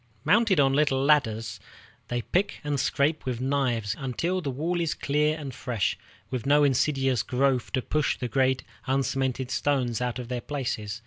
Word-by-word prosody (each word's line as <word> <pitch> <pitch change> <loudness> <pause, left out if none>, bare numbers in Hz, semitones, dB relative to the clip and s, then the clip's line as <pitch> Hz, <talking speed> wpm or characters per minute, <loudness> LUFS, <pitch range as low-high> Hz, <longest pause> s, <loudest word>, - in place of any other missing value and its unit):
Mounted 210 -2 +4
on 135 -1 +4
little 140 -2 +2
ladders, 115 -7 +2 0.5
they 120 -1 -2
pick 195 +3 0
and 145 -1 -1
scrape 145 +3 +1
with 125 -3 -3
knives 125 -6 0
until 165 +8 -1
the 145 - -3
wall 165 +7 -1
is 165 -3 -1
clear 150 +2 +1
and 140 -4 -6
fresh, 120 -5 -1 0.4
with 125 -4 -2
no 145 +1 +5
insidious 135 -3 +2
growth 130 0 0
to 130 -2 0
push 150 -1 0
the 125 - -3
great 130 +2 +1 0.2
uncemented 130 -1 0
stones 130 -5 0
out 125 -1 -1
of 125 -2 -6
their 125 0 -3
places. 115 -7 -3
135 Hz, 170 wpm, -27 LUFS, 125-145 Hz, 0.5 s, no